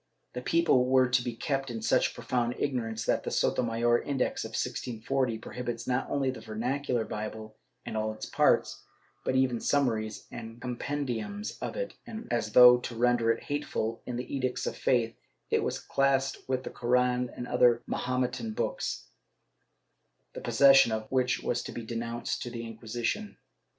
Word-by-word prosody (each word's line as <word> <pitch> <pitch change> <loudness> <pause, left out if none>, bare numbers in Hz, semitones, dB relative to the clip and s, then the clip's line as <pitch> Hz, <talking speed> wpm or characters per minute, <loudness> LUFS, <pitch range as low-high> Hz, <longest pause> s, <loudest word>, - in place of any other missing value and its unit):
^ - - -46
The 125 - -4
people 165 -4 +3
were 130 0 +5
to 125 0 +2
be 120 -2 -4
kept 135 +1 -2
in 115 -2 -4
such - - +2
profound 120 -1 -1
ignorance 115 -5 -2
that - - +2
the - - -4
Sotomayor 120 0 +2
Index 140 -3 -1
of - - -7
1640 125 0 -1
prohibits, 120 +1 -5
not 125 +1 -1
only 135 -2 +1
the 125 - -8
vernac 120 +6 -3
ular 120 -3 0
Bible 110 0 -6 0.3
and - - -5
all 110 0 0
its 110 - -7
parts, - - +2 0.4
but 130 - 0
even 130 -3 +2
summaries 110 -7 0
and 115 0 -8
compendiums 130 - -3
of - - -4
it - - -3
and, 225 +1 -7
as 110 -3 -1
though 125 0 +9
to 120 -1 -6
render 120 0 +2
it 115 - -3
hateful, 130 -6 -2
in 125 - -3
the 125 +3 -4
Edicts 130 -2 -1
of - - -2
Faith, 115 -2 +1 0.4
it - - +3
was - - -1
classed 135 -1 0
with 130 -1 0
the - - -6
Koran 125 0 +1
and 125 - -5
other 120 -1 +4
Mahometan 125 - -2
books, - - -2 1.3
the - - -7
possession 135 -3 +6
of 110 0 -3
which 130 -1 +1
was 120 - 0
to - - -7
be 120 - -6
denounced 115 +1 -3
to 120 - -4
the 115 -1 -6
Inquisition. 115 - -3
125 Hz, 170 wpm, -29 LUFS, 115-130 Hz, 1.3 s, though